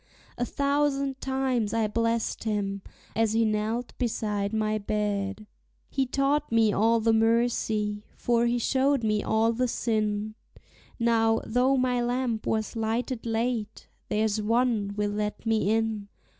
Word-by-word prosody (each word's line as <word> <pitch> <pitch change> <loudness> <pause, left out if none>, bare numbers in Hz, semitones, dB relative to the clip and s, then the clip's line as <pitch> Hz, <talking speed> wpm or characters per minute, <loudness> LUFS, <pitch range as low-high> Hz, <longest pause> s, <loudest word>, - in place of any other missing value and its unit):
A 245 - -1
thousand 280 -1 0
times 260 -5 0
I 225 -1 +2
blest 230 +1 -1
him, 200 -2 -1 0.3
as 225 -1 +2
he 225 0 +3
knelt 220 +3 -1
beside 210 -4 -1
my 215 -1 0
bed. 205 0 -2 0.5
He 270 -1 0
taught 280 +2 0
me 225 -2 +4
all 230 +3 +3
the 225 0 +2
mercy, 220 -2 +1
for 235 0 +2
he 240 +1 +1
showed 265 +2 +1
me 215 -1 +1
all 225 +1 +2
the 250 +2 0
sin; 215 -2 -1 0.6
Now, 225 -1 +3
though 255 +3 +2
my 250 -1 +1
lamp 240 -2 -1
was 220 0 -1
lighted 230 +2 -2
late, 225 -1 -2 0.2
there's 215 0 +1
One 225 -2 +1
will 205 0 0
let 210 +2 -3
me 220 -3 +1
in. 220 -2 0
225 Hz, 140 wpm, -27 LUFS, 215-245 Hz, 0.6 s, me